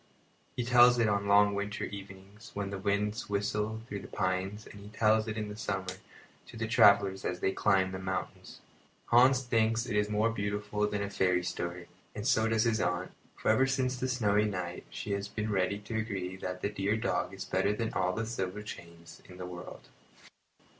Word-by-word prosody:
He 120 - -2
tells 120 0 +7
it 115 -2 +3
on 100 -1 +2
the 100 - -4
long 105 0 +6
winter 100 +1 -3
evenings 100 +2 -9
when 100 -1 -3
the 100 - -4
winds 105 +4 -1
whistle 105 +2 -1
through 100 -4 -5
the - - -10
pines 95 +2 -2
and 100 - -12
he 100 - -11
tells 110 +1 +2
it 110 0 -3
in 105 -1 -2
the 105 - -7
summer 95 -4 -3 0.5
to - - -11
the 110 0 -2
travellers 100 -3 +5
as 90 0 -2
they 95 - +1
climb 95 -1 +2
the 95 - -5
mountains. 95 0 -5 0.5
Hans 125 +2 +6
thinks 115 -1 +1
it 110 - -3
is 105 0 +2
more 105 +2 +2
beautiful 105 0 -1
than 105 -1 -2
a 100 - -3
fairy 90 -2 +2
story, 85 0 -4 0.3
and 105 - -5
so 110 -4 +3
does 110 0 +2
his 115 -3 +1
aunt; 90 +1 -1 0.2
for - - -1
ever 130 +5 +4
since 130 -1 0
that 130 - -1
snowy 105 -4 +2
night 90 -4 -4
she 105 - -6
has 100 0 -2
been 105 +1 -3
ready 95 0 +1
to 110 +2 -4
agree 95 -4 -3
that 90 -1 -6
the - - +1
dear 105 +1 0
dog 95 -4 -1
is 95 -1 -7
better 95 +2 +1
than 110 +2 -2
all 90 0 +1
the 110 +4 -2
silver 105 -3 -4
chains 85 -5 -11
in 90 - -11
the 90 - -6
world. 90 0 -9
105 Hz, 205 wpm, -31 LUFS, 95-110 Hz, 0.5 s, tells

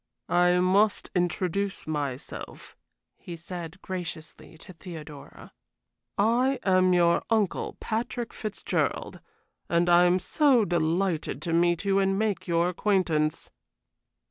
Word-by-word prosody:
"I 180 0 +4
must 195 +3 +2
introduce 185 +2 -1
myself," 145 -4 -6 0.4
he 175 - -8
said, 170 +1 -8
graciously, 170 -4 -7
to 185 - -13
Theodora. 160 -4 -11 0.6
"I 245 +6 +2
am 185 -1 +3
your 170 -1 +3
uncle, 215 -5 0
Patrick 235 +1 -3
Fitzgerald, 215 -2 -3 0.5
and 170 +1 +2
I 175 +1 +6
am 180 +1 +4
so 250 - +3
delighted 170 -3 0
to 165 - -2
meet 175 +2 +2
you 195 0 +3
and 195 0 +1
make 210 -3 -1
your 170 0 +2
acquaintance." 175 -5 0
180 Hz, 115 wpm, -27 LUFS, 170-200 Hz, 0.6 s, I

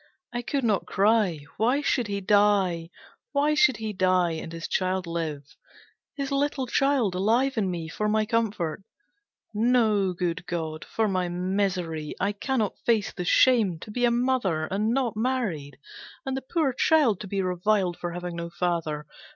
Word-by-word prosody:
I 240 - -2
could 275 +2 -2
not 215 -4 +1
cry. 200 -6 +2 0.2
Why 245 +7 +2
should 245 -5 0
he 200 -1 -3
die? 195 -4 +2 0.4
Why 290 +1 +2
should 265 -6 +4
he 220 -1 -4
die 185 -2 +2
and 160 0 -5
his 165 0 -5
child 185 0 0
live? 165 -4 -3 0.7
His 275 -1 -3
little 275 -1 0
child 260 -5 +1
alive 230 +9 +2
in 205 -5 0
me, 170 -3 -4
for 210 +6 -2
my 215 0 +2
comfort. 210 -8 -1 0.7
No, 215 -4 +2
Good 175 0 -3
God, 160 -2 -4
for 220 -1 0
my 185 -3 0
misery! 180 -4 -2
I 200 +2 +1
cannot 215 +1 -2
face 225 -4 +1
the 180 - -5
shame, 220 -4 +4
to 215 - -9
be 245 +3 -2
a 240 - +5
mother, 235 -10 +1
and 205 +6 -1
not 250 -3 0
married, 210 - -2 0.5
and 265 -1 -2
the 265 - -3
poor 280 0 0
child 255 - +3
to 205 - -7
be 195 0 -1
reviled 185 0 +1
for 175 0 -5
having 175 0 -5
no 170 0 -4
father. 165 -4 -2
200 Hz, 165 wpm, -26 LUFS, 175-240 Hz, 0.7 s, a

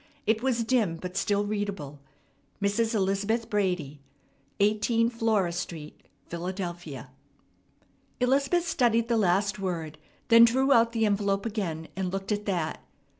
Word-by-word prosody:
It 220 +1 +2
was 245 -3 +1
dim 225 -8 +1
but 180 +2 -7
still 200 +1 +1
readable, 200 -9 -4 0.6
"Mrs. 220 +3 0
Elizabeth 200 +3 0
Brady, 180 -9 -1 0.6
18 220 +3 +2
Flora 220 -6 +1
Street, 170 -3 -6 0.2
Philadelphia." 175 -4 -6 1.1
Elizabeth 275 +7 +2
studied 235 -6 +2
the 235 - +2
last 200 +1 +1
word, 165 -5 -4 0.3
then 230 0 +8
drew 265 +4 +4
out 230 -1 +4
the 225 -1 +1
envelope 200 -1 0
again, 175 -8 -3
and 185 -1 -2
looked 195 +2 -4
at 210 0 -2
that. 175 -5 -2
205 Hz, 125 wpm, -27 LUFS, 180-230 Hz, 1.1 s, then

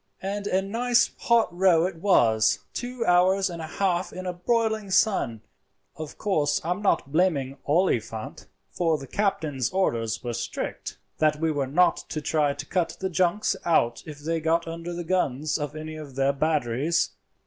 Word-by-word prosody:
"And 200 +1 -3
a 190 0 +1
nice 240 +4 +2
hot 230 -6 +2
row 175 -2 +4
it 185 -2 -4
was—two 190 - +1
hours 185 +2 +3
and 170 -1 -6
a 160 - -5
half 180 +1 -1
in 185 0 -7
a 180 - -2
broiling 220 +2 0
sun. 190 - +2 0.5
Of 155 -2 -8
course 155 -9 +1
I 170 - -1
am 180 +3 -2
not 195 -8 +1
blaming 145 -6 +1
Oliphant, 120 - -1 0.2
for 165 -3 +1
the 135 - -9
captain's 150 - -1
orders 115 - -1
were 120 -1 -3
strict - - -5 0.2
that 155 -1 +2
we 160 0 +1
were 140 -3 -1
not 175 +6 +3
to 155 - -3
try 150 -1 +1
to 145 0 -6
cut 175 +1 -1
the 190 -1 -2
junks 185 +4 +1
out 120 -8 +2
if 150 -2 -8
they 165 +2 -1
got 165 +1 +1
under 165 +1 -5
the 175 0 -4
guns 155 -5 0
of 150 +1 -4
any 155 0 -6
of 145 -4 -9
their 135 +1 +2
batteries. 150 +1 0
165 Hz, 170 wpm, -26 LUFS, 145-190 Hz, 0.5 s, row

